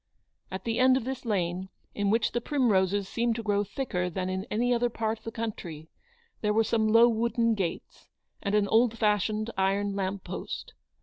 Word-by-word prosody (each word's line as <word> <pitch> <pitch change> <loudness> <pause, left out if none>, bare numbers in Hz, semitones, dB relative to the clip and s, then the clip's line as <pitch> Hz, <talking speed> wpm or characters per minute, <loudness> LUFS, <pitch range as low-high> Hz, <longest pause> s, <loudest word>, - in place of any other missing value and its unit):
At 190 0 -6
the 230 0 -1
end 255 0 +6
of 260 - -3
this 260 +1 -5
lane, 185 -3 -1 0.2
in 205 -1 0
which 220 +1 +2
the 240 - -1
primroses 205 -8 +2
seemed 235 +2 0
to 230 - -4
grow 205 -1 +1
thicker 195 -4 -2
than 185 +1 -3
in 190 +3 -3
any 245 +3 +1
other 240 0 +1
part 220 -1 -2
of - - -30
the 225 - -4
country, 175 -9 -6 0.5
there 210 -1 +1
were 225 +1 +4
some 220 0 +1
low 230 +2 +7
wooden 230 0 +1
gates, 185 -6 -4 0.3
and 200 0 0
an 205 -1 +3
old 230 +2 +3
fashioned 215 +1 +1
iron 200 +1 +1
lamp 195 0 -2
post. - - -6
215 Hz, 190 wpm, -28 LUFS, 195-230 Hz, 0.5 s, low